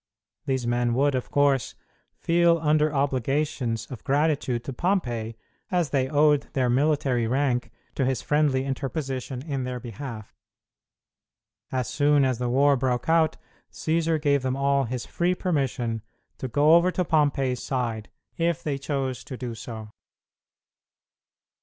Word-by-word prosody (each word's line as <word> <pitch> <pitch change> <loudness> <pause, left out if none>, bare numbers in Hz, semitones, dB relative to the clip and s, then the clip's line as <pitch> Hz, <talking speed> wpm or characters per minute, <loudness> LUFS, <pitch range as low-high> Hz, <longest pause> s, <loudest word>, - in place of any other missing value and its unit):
These 130 -3 0
men 120 0 +1
would, 140 +2 +2
of 130 -1 -2
course, 140 -3 +2 0.4
feel 170 0 +3
under 155 -1 +2
obligations 135 -4 -1
of 125 - -8
gratitude 140 -4 +1
to 135 - -5
Pompey 120 - -1 0.3
as 175 -6 0
they 130 -2 +1
owed 150 -1 +3
their 125 -3 +1
military 135 -3 +1
rank 130 0 0 0.2
to - - -1
his 130 0 0
friendly 145 -3 +2
interposition 135 -2 -4
in 140 -4 -3
their 125 0 -4
behalf. 115 -1 -8 1.4
As 130 -2 -1
soon 145 -1 +3
as 130 -3 0
the 125 -1 -1
war 140 +3 +4
broke 125 +1 -1
out 160 -1 +3 0.3
Cćsar 160 0 0
gave 140 -2 +2
them 130 0 -1
all 140 0 +2
his 125 +1 -4
free 175 +1 0
permission 130 - -1 0.4
to 130 - -3
go 145 +6 +4
over 170 +2 +6
to 180 0 -1
Pompey's 140 -5 +1
side 115 -5 -3 0.3
if 170 0 0
they 140 -3 -2
chose 135 -3 -3
to 130 - -7
do 120 -2 -5
so. 110 -1 -8
135 Hz, 140 wpm, -25 LUFS, 125-150 Hz, 1.4 s, over